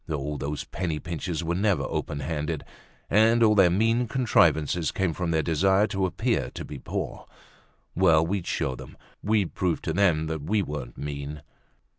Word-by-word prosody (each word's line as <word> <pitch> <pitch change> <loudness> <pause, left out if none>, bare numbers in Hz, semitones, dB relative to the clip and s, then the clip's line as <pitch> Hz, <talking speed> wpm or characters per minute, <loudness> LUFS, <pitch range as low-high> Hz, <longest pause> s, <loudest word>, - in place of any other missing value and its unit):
Oh, 75 -1 -2
those 70 +1 -4
penny 85 -2 -3
pinchers 85 +1 -4
were 85 +1 -1
never 100 +1 +1
open 70 - -3
handed, 75 +1 -3 0.4
and 115 +3 +4
all 110 -1 +5
their 95 -4 +6
mean 115 +6 +2
contrivances 85 - +2
came 95 -4 0
from 90 +1 -3
their 80 -1 +1
desire 95 +5 +3
to 95 -1 0
appear 90 - -1
to - - -5
be 75 - -8
poor. - - -5 0.7
Well, 80 -3 +4
we'd 95 0 -2
show 65 - -1
them, - - -11 0.2
we'd 105 -3 +1
prove 90 -3 0
to 80 - -2
them 85 -4 +2
that 80 -1 -3
we 100 +7 0
weren't 70 -7 -6
mean. 70 0 -6
85 Hz, 170 wpm, -26 LUFS, 75-100 Hz, 0.7 s, their